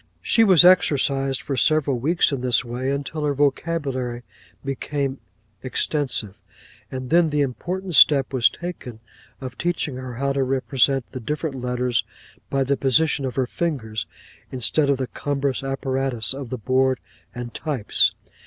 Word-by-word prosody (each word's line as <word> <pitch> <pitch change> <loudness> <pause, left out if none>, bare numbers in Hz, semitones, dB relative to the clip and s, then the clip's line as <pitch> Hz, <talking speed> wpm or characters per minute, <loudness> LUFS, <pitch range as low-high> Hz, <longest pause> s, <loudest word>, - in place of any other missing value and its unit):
'She 225 - +4
was 185 -6 +7
exercised 135 -6 +3
for 140 - -3
several 145 -2 +2
weeks 160 +7 +2
in 135 -3 -2
this 125 0 +2
way, 125 +3 -3
until 140 +2 -3
her 145 -1 0
vocabulary 135 -4 -1 0.4
became 135 0 -3 0.4
extensive; 130 -5 -1 0.6
and 130 0 -6
then 170 -1 +4
the 150 -1 +1
important 180 +8 -3
step 140 -2 +6
was 125 -3 +4
taken 170 -10 -8 0.4
of 130 -2 -8
teaching 170 -6 -1
her 130 -2 -7
how 140 +2 -1
to 135 - 0
represent 135 0 +1
the 130 - -6
different 150 +1 -4
letters 125 -2 0 0.5
by 135 -1 +1
the 140 +1 +1
position 140 +1 +2
of 130 - -4
her 130 - +1
fingers, 120 -8 -3 0.4
instead 135 +4 +1
of 140 - +3
the 130 - -2
cumbrous 140 0 -2
apparatus 135 -4 -2
of 135 -2 -7
the 130 - -3
board 130 +2 +1 0.4
and 120 -1 -6
types. 140 -9 +1
135 Hz, 150 wpm, -23 LUFS, 125-145 Hz, 0.6 s, was